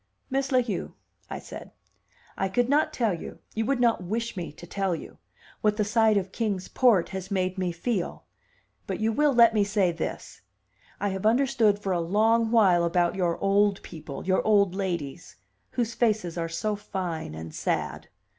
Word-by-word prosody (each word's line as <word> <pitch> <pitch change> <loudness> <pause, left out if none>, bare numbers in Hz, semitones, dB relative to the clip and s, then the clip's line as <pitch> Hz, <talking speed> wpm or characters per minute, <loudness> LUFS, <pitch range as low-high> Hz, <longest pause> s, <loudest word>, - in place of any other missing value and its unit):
"Miss 270 0 0
La 255 -1 +4
Heu," 210 -6 -4 0.3
I - - -4
said, - - -10 0.6
"I 195 - -1
could 240 +5 +1
not 295 +3 +2
tell 225 -5 0
you, 170 - -7 0.2
you 225 0 -1
would 275 -2 +1
not 235 -6 +2
wish 230 +6 -3
me 170 -5 -5
to 175 - -11
tell 190 0 -1
you, - - -10 0.4
what 210 0 +2
the 215 - +2
sight 220 0 +3
of 190 -1 -2
Kings 200 -5 -2
Port 230 -9 +3
has 190 0 -6
made 185 -1 -1
me 180 -2 0
feel. 180 +2 -3 0.6
But - - -3
you 220 +1 +1
will 295 +5 +3
let 235 -3 +6
me 210 -2 +3
say 200 -3 +1
this: 165 -1 -6 0.6
I 205 - 0
have 190 +2 -1
understood 235 -3 +3
for 200 -2 -3
a 175 - 0
long 220 +6 +2
while 195 -7 +4
about 170 0 +2
your 175 -3 0
old 200 0 +2
people, 155 -4 -8
your 185 0 +2
old 200 -4 +3
ladies, 175 -8 -4 0.4
whose 230 -2 -1
faces 215 -8 0
are 165 -1 -2
so 210 +6 -1
fine 180 - -4
and 80 0 -8
sad." - - -2
200 Hz, 185 wpm, -27 LUFS, 180-225 Hz, 0.6 s, let